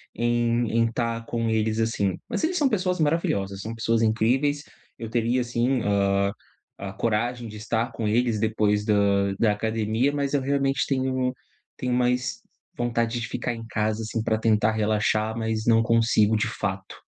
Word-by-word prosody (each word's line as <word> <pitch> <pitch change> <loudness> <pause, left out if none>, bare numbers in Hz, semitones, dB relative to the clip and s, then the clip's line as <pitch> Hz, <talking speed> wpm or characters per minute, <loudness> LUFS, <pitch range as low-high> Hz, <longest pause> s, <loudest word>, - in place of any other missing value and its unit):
em 120 0 +1
em 115 0 +2
tá 115 -1 -1
com 115 0 -2
eles, 110 0 0
assim. 100 -5 0
Mas - - -2
eles 350 +3 +1
são 290 -4 +3
pessoas 185 -5 0
maravilhosas, 100 - 0
são 110 +3 -6
pessoas 115 0 +1
incríveis. 125 +7 +1 0.3
Eu 115 - -6
teria 120 +2 +1
sim, 120 +1 0
hã, 100 -1 +2 0.5
a 95 -1 -6
coragem 115 +3 -1
de 105 - -9
estar 115 +3 -2
com 115 -2 -3
eles 115 0 +1
depois 105 -1 +1
da 100 -2 +2
da 110 -1 +3
academia, 110 +4 0
mas 140 -1 -1
eu 140 - +2
realmente 140 0 +1
tenho 130 -1 0 0.4
tenho 125 -1 -2
mais 125 0 0 0.4
vontade 115 0 0
de 115 - -4
ficar 120 - -3
em 115 -1 -8
casa, 110 0 -1
assim, 110 0 -3
pra 110 -1 +1
tentar 110 -1 +2
relaxar, 110 0 0
mas 110 -1 -2
não 115 -1 +4
consigo 115 -2 +3
de 105 - 0
fato. 95 -2 -4
115 Hz, 170 wpm, -25 LUFS, 110-120 Hz, 0.5 s, não